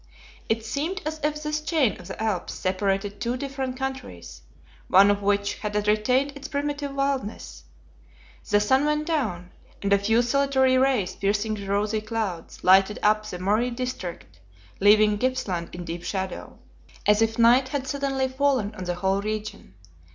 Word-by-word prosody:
It 225 0 0
seemed 315 +10 -2
as 310 0 -3
if 300 0 -1
this 300 0 -2
chain 305 - +1
of 180 - -11
the 190 - -8
Alps 215 -5 -2
separated 195 +2 -1
two 240 +1 -1
different 265 -1 -4
countries, 260 - -6 0.5
one 195 +2 +6
of 205 0 -1
which 200 0 0
had 210 -1 -4
retained 250 +7 +2
its 280 0 -7
primitive 285 -1 -3
wildness. 275 -6 -3 0.8
The 205 -1 +4
sun 260 +7 +3
went 300 0 0
down, 210 - -2 0.3
and 200 0 +1
a 200 - +4
few 225 +4 +2
solitary 265 0 +2
rays 255 -7 +2
piercing 205 +2 0
the 200 -2 -6
rosy 210 +2 0
clouds, 215 -6 -4
lighted 190 +3 +5
up 215 0 +3
the 180 - -5
Murray 210 +7 +1
district, 215 - -6 0.4
leaving 210 +1 +5
Gippsland 210 -10 -1
in 175 0 -7
deep 170 +1 -6
shadow, 190 -2 -4 0.5
as 210 +1 +4
if 225 0 +1
night 240 +3 +5
had 275 -1 -2
suddenly 270 -1 -1
fallen 260 -5 0
on 185 -3 -7
the 175 0 -2
whole 190 +2 0
region. 215 - -5
215 Hz, 160 wpm, -25 LUFS, 200-265 Hz, 0.8 s, one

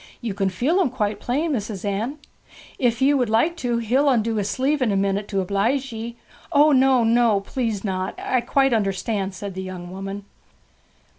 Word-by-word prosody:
'You 230 -4 -3
can 195 -1 0
feel 270 - +1
'em 340 - +2
quite 210 -4 -2
plain, 295 +7 -1
Mis'ess 210 -6 -3
Anne. 215 +8 -2 0.6
If 245 0 +1
ye 280 +2 +5
would 250 -5 +1
like 235 +10 +2
to, 245 -6 -1
he'll 255 +5 +2
undo 230 -3 +1
his 205 -1 -1
sleeve 275 +6 0
in 240 -4 +2
a - - +1
minute 195 +1 0
to 195 -2 -1
oblege 230 +8 0
ye?' 230 +1 -6 0.4
'O 300 0 +5
no, 260 -2 +4
no, 230 -3 +3
please 225 -2 -3
not! 190 -2 -2
I 255 - 0
quite 270 +2 +2
understand,' 195 -1 -1
said 200 0 -6
the 190 - -5
young 180 -1 -7
woman. 195 +1 -6
225 Hz, 190 wpm, -23 LUFS, 195-260 Hz, 0.6 s, ye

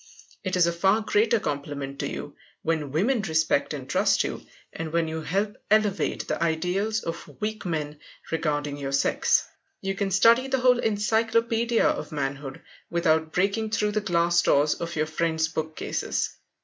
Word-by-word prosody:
It 185 -1 -1
is 180 -2 +5
a 170 - +1
far 195 +5 +3
greater 220 +1 +2
compliment 140 -3 -4
to - - -1
you - - -7 0.3
when 155 -4 -1
women 215 - +1
respect 160 -5 +1
and 140 -4 -5
trust 200 +4 +2
you, - - -5 0.3
and 160 -1 -5
when 165 0 +1
you 160 0 -4
help 200 +6 -1
elevate 210 -2 +1
the - - -2
ideals 180 +7 0
of 165 - -7
weak 215 -1 -3
men 150 -3 -3 0.3
regarding 150 -3 -1
your 140 -1 -4
sex. 140 - +2 0.3
You 195 0 -2
can 195 0 -1
study 230 +7 +5
the 265 -1 0
whole 250 -1 +5
Encyclopedia 225 +2 +1
of - - -2
Manhood 135 -2 -4 0.3
without 160 -2 +1
breaking 200 +6 0
through 210 -1 0
the 215 0 0
glass 175 -2 +2
doors 145 -1 +3
of 170 0 -5
your 155 0 +1
friend's 160 0 0
bookcases. 160 -1 -2
170 Hz, 160 wpm, -26 LUFS, 155-210 Hz, 0.3 s, is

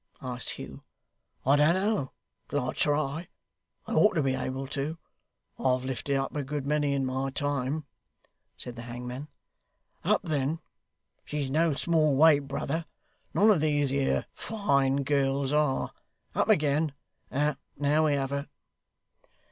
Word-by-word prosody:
asked 125 -2 -2
Hugh. - - -8 0.6
'I 140 +3 +5
don't 150 +4 +5
know 195 -7 0 0.4
till - - 0
I - - -2
try. 150 +3 0 0.6
I - - -4
ought 210 - +5
to 155 -4 +1
be 135 -1 +2
able 130 +1 -3
to; 145 +3 -3 0.6
I've 130 -1 +1
lifted 135 +2 -1
up 135 +1 -1
a 145 - -1
good 140 0 -3
many 145 -1 +1
in 135 -1 0
my 130 +1 -1
time,' 145 +1 -1 0.7
said 125 - -5
the - - -5
hangman. 125 +4 -6 0.8
'Up - - +3
then! 150 -1 0 0.7
She's 145 -3 -3
no 160 0 +3
small 155 -2 +2
weight, 145 -1 +6
brother; 160 +4 -2 0.5
none 215 +2 +6
of 180 -8 +3
these 145 -3 +2
here 140 0 +1
fine 140 -10 +1
gals 135 0 +1
are. 150 -3 +1 0.4
Up - - +1
again! 150 0 +3 0.4
Now 145 0 +1 0.5
we 150 - +3
have 135 -1 -1
her. 140 +1 -3
140 Hz, 140 wpm, -29 LUFS, 135-150 Hz, 0.8 s, weight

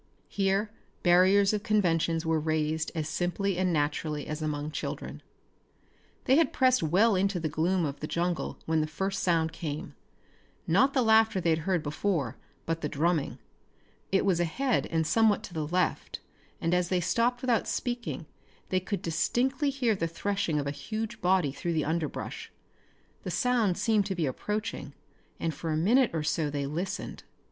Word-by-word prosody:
Here 195 +1 0 0.3
barriers 190 +3 +5
of 210 - 0
conventions 170 -6 +1
were 160 -1 +2
razed 155 0 -1
as 155 -2 -2
simply 180 +4 -1
and 185 -1 +2
naturally 150 -1 -1
as 155 +1 -5
among 150 0 -2
children. - - -5 1.0
They 265 - +5
had 330 - +3
pressed 255 -1 +3
well 190 +7 +3
into 195 0 +1
the 160 - -1
gloom 170 +3 +1
of 140 -1 -4
the 150 - -4
jungle 175 +1 -2
when 160 -1 +1
the 155 - -1
first 195 +6 -2
sound 165 -2 +1
came. 155 -2 -5 0.7
Not 275 +1 +3
the 260 - +4
laughter 220 -2 +4
they 170 -2 +1
had 160 - +2
heard 180 -4 +1
before, 145 - -1 0.3
but 165 0 -2
the 150 - -2
drumming. 160 0 0 0.7
It 195 - +2
was 185 -4 +2
ahead 235 +10 0
and 160 -1 0
somewhat 220 +3 +3
to 180 - -9
the 155 -2 -2
left, 180 +3 -1 0.4
and 165 - 0
as 180 -1 +1
they 185 - +2
stopped 240 +7 +1
without 245 -4 +1
speaking 240 -8 -3 0.4
they 185 - +2
could 195 +2 -4
distinctly 260 - +1
hear 260 -5 +1
the 165 -3 -1
threshing 195 -1 -1
of 145 - -1
a 140 - -1
huge 215 +8 -5
body 180 -5 +2
through 170 +5 -3
the 155 -2 0
underbrush. 160 -1 -3 0.7
The - - -5
sound 240 -8 +1
seemed 215 -3 +2
to 190 - -2
be 170 -3 0
approaching 210 - -3 0.5
and 165 - -1
for 165 +3 -5
a 155 - 0
minute 230 +10 +4
or 160 -2 -2
so 150 0 0
they 145 -1 -2
listened. 165 +7 -4
175 Hz, 170 wpm, -29 LUFS, 160-210 Hz, 1.0 s, barriers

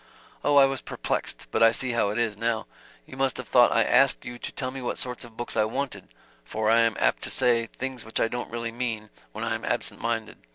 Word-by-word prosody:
"Oh, 145 - +3
I 140 -1 +8
was 135 -2 -2
perplexed - - -3
but - - 0
I 115 0 +8
see 125 +2 -2
how 115 -4 +1
it 105 - -3
is, 115 -3 0
now. 115 +1 -1 0.4
You 130 - -11
must 135 -2 +1
have - - -6
thought 120 -1 +6
I 115 - +4
asked 135 +3 +4
you 120 0 -7
to - - -5
tell 130 -2 -4
me 135 0 -6
what 120 - -3
sort 125 -2 -4
of 115 -2 -14
books 120 - -5
I 110 - +4
wanted 110 -3 -3 0.4
for 110 - 0
I 115 - +6
am 115 -1 +3
apt - - +2
to - - -4
say 115 -2 +2
things 130 0 -6
which 110 - -3
I - - +3
don't 120 +2 -4
really 115 0 -4
mean, 115 -3 -3 0.2
when - - -5
I - - 0
am - - -4
absent - - -2
minded. 115 -1 -2
115 Hz, 250 wpm, -26 LUFS, 110-125 Hz, 0.4 s, I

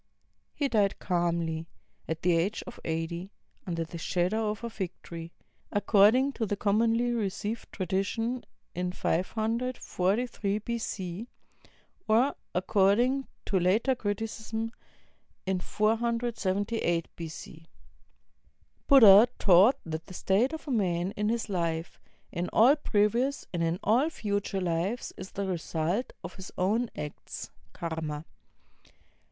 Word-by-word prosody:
He 285 - +1
died 205 -6 +2
calmly, 170 -2 -1 0.4
at 160 0 -3
the 175 -1 +4
age 185 +6 0
of 245 - -10
eighty, 165 +3 -3 0.4
under 170 -2 -1
the 165 +1 -8
shadow 200 +6 0
of 210 +2 -4
a 235 - -2
fig 190 -5 -3
tree, 165 0 -8 0.4
accord 205 +1 +5
ing 265 +2 +2
to 230 -5 -2
the 205 - 0
commonly 230 +4 +2
received 215 0 -3
tradition 205 +6 -1 0.3
in 180 0 -2
543 220 +1 -1
B.C.; 215 -3 -4 0.8
or 240 +6 +3 0.2
according 215 +8 +3 0.2
to 195 - +1
later 205 +9 +3
criticism 220 0 -3 0.7
in 190 -1 0
478 220 -4 0
B.C. 160 0 -8 1.2
Buddha 225 -5 +9
taught 195 +6 +6
that 160 0 -5
the 185 - -9
state 210 +10 +2
of 320 0 -7
a - - -2
man 185 -5 +1
in 210 0 -2
this 230 +1 0
life, 170 -4 -2 0.3
in 175 +2 -2
all 250 +6 +6
previous 240 +1 +1
and 170 - -1
in 165 +1 +1
aU 245 +9 +3
future 205 -7 -2
lives, 180 +7 -1
is 190 0 -9
the 200 0 -2
result 175 +4 -1
of - - -6
his 190 -1 -9
own 220 +6 +1
acts 150 -1 -7 0.2
(karma). 160 -2 -4
200 Hz, 125 wpm, -29 LUFS, 175-230 Hz, 1.2 s, Buddha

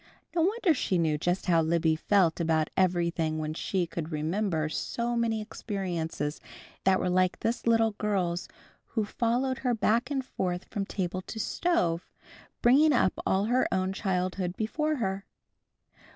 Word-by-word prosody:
No 335 - +3
wonder 390 0 +3
she 200 -9 0
knew 155 -3 +1
just 175 +4 0
how 170 -3 +4
Libby 160 0 +2
felt 180 0 +2
about 160 -2 +1
everything 170 -3 +1
when 155 0 -3
she 180 +2 -1
could 165 -1 -5
remember 160 +1 0
so 235 +9 -2
many 225 -2 0
experiences 175 -8 -4 0.4
that 190 0 +4
were - - -1
like 185 0 +2
this 235 +1 -2
little 225 -1 +4
girl's 190 -4 -1 0.4
who 220 -3 -2
followed 245 +4 0
her 250 -2 +1
back 230 +3 +1
and 270 -3 -2
forth 180 -7 -3
from 200 -3 -4
table 185 -1 -2
to 220 - -7
stove, 180 - 0 0.5
bringing 285 +5 +6
up 190 -7 +3
all 195 +2 +2
her 245 +3 +2
own 190 0 0
childhood 185 -2 -1
before 305 +8 0
her. 195 -6 -2
190 Hz, 150 wpm, -28 LUFS, 170-230 Hz, 0.5 s, bringing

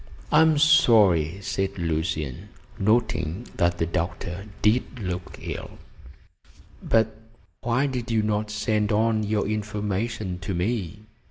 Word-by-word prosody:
"I 150 - +6
am 160 -2 +4
sorry," 110 - +5
said 95 0 -2
Lucian, 80 -5 -2 0.3
noting 110 -2 +1
that 85 0 +2
the 85 - +1
doctor 90 +2 -3 0.2
did 120 +4 +2
look 90 -3 -5
ill, - - -7 1.0
"but 110 -1 +2 0.5
why 120 +4 +1
did 125 -3 -3
you 110 -2 +2
not 105 0 -1
send 105 0 0
on 110 +1 +2
your 105 -1 0
information 105 -2 -2
to 95 0 -4
me?" 100 0 -2
105 Hz, 120 wpm, -25 LUFS, 90-115 Hz, 1.0 s, I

